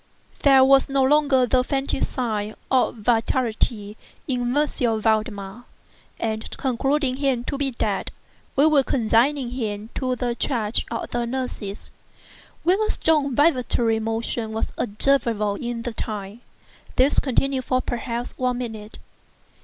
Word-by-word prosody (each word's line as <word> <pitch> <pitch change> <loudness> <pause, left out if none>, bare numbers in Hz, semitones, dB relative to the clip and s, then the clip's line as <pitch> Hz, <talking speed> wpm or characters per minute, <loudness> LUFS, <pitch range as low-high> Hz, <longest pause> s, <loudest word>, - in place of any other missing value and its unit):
There 270 -2 +6
was 270 +1 +5
no 275 -1 +2
longer 280 -2 +4
the 250 +1 +2
faintest 270 0 -1
sign 215 -4 -2 0.2
of 260 -2 +2
vitality 225 -2 0 0.3
in 250 -1 -1
M. 300 +1 +3 0.3
Valdemar; 215 0 -1 0.5
and 220 -1 -3
concluding 270 +1 0
him 270 -4 0
to 280 - -3
be 275 0 0
dead, 215 -5 -2 0.5
we 280 - +5
were 305 -3 +5
consigning 250 +2 +1
him 220 -3 -4
to 255 -1 -1
the 245 -1 -1
charge 230 -3 0
of 230 - -4
the 240 0 -1
nurses, 235 -5 -5 0.7
when 370 +5 +3
a 430 - 0
strong 290 -5 +1
vibratory 250 -6 +2
motion 225 0 -3
was 220 - -3
observable 225 -2 +1
in 235 +2 -4
the 240 - -4
tongue. 210 -1 -5 0.6
This 265 +3 +4
continued 265 0 0
for 255 - +1
perhaps 240 -1 -4
a 250 -1 +1
minute. 220 -3 -6
245 Hz, 135 wpm, -23 LUFS, 220-270 Hz, 0.7 s, There